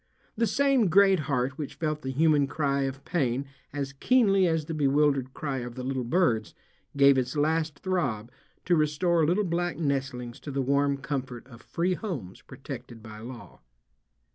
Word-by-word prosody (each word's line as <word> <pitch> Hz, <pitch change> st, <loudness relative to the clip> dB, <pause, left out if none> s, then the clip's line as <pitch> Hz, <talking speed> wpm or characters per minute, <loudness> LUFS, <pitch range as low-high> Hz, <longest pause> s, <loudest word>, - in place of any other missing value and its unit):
The 230 Hz, +1 st, +1 dB
same 270 Hz, 0 st, +3 dB
great 195 Hz, +1 st, +5 dB
heart 130 Hz, 0 st, -1 dB
which 145 Hz, -, -5 dB
felt 155 Hz, -2 st, -2 dB
the 130 Hz, -, -4 dB
human 145 Hz, +1 st, +3 dB
cry 140 Hz, -2 st, 0 dB
of 135 Hz, 0 st, -6 dB
pain 135 Hz, -5 st, 0 dB, 0.3 s
as 140 Hz, -1 st, -4 dB
keenly 195 Hz, -, +3 dB
as 160 Hz, -2 st, 0 dB
the 160 Hz, -, -5 dB
bewildered 140 Hz, -2 st, +2 dB
cry 140 Hz, -3 st, -3 dB
of 120 Hz, -1 st, -7 dB
the 130 Hz, -, -6 dB
little 130 Hz, 0 st, -2 dB
birds 120 Hz, -, +1 dB, 0.4 s
gave 140 Hz, -1 st, +6 dB
its 130 Hz, +3 st, -3 dB
last 155 Hz, 0 st, 0 dB
throb 130 Hz, -, -1 dB, 0.3 s
to 175 Hz, -, +3 dB
restore 160 Hz, +2 st, +2 dB
little 185 Hz, +6 st, +2 dB
black 175 Hz, -1 st, -1 dB
nestlings 135 Hz, -5 st, -2 dB
to -, -, -9 dB
the 135 Hz, -1 st, -1 dB
warm 140 Hz, +1 st, +2 dB
comfort 135 Hz, -3 st, -5 dB
of 120 Hz, -3 st, -14 dB
free 175 Hz, +2 st, -1 dB
homes 150 Hz, -, -6 dB
protected 125 Hz, -4 st, -9 dB
by 110 Hz, -1 st, -10 dB
law. 120 Hz, +2 st, -10 dB
140 Hz, 165 wpm, -27 LUFS, 130-165 Hz, 0.4 s, gave